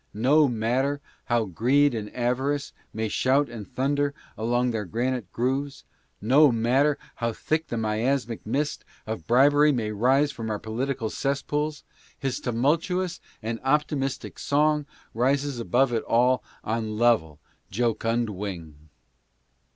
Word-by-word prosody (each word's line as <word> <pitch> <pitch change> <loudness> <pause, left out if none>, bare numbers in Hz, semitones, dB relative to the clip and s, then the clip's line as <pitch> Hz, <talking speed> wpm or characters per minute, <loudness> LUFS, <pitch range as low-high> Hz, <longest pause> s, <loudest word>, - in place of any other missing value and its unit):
No 140 +7 +4
matcer 125 +5 0 0.3
how 120 -2 +1
greed 125 - +2
and 105 -2 -4
avarice 130 +4 -1 0.2
may 110 0 -2
shout 135 +6 +2
and 110 -4 -8
thunder 140 +2 0 0.2
along 120 +2 0
their 110 -2 -2
granite 120 0 -2
grooves 135 +3 -2 0.2
— - - -43
no 135 +6 +5
matter 130 +6 +2 0.2
how 115 -1 -1
thick 155 +7 -1
the 120 - -3
miasmatic 115 +2 -1
mist 140 +7 -2 0.2
of 110 -7 -5
bribery 145 +4 +5
may 115 -5 -1
rise 130 +7 +3
from 115 -5 -6
our 105 - -1
political 115 +2 -3
cess 140 0 -1
pools 150 0 -2 0.2
— - - -27
his 135 -2 -2
tumultuous 160 +9 0 0.2
and 115 +1 -3
optimistic 135 -1 -1
song 150 0 +1 0.3
rises 135 +2 0
above 120 +2 +2
it 115 - +1
all 125 +1 +3 0.2
on 110 -1 -2
level, 110 -11 +2 0.3
jocund 115 +1 0
wing. 85 -6 -7
125 Hz, 135 wpm, -26 LUFS, 110-140 Hz, 0.3 s, no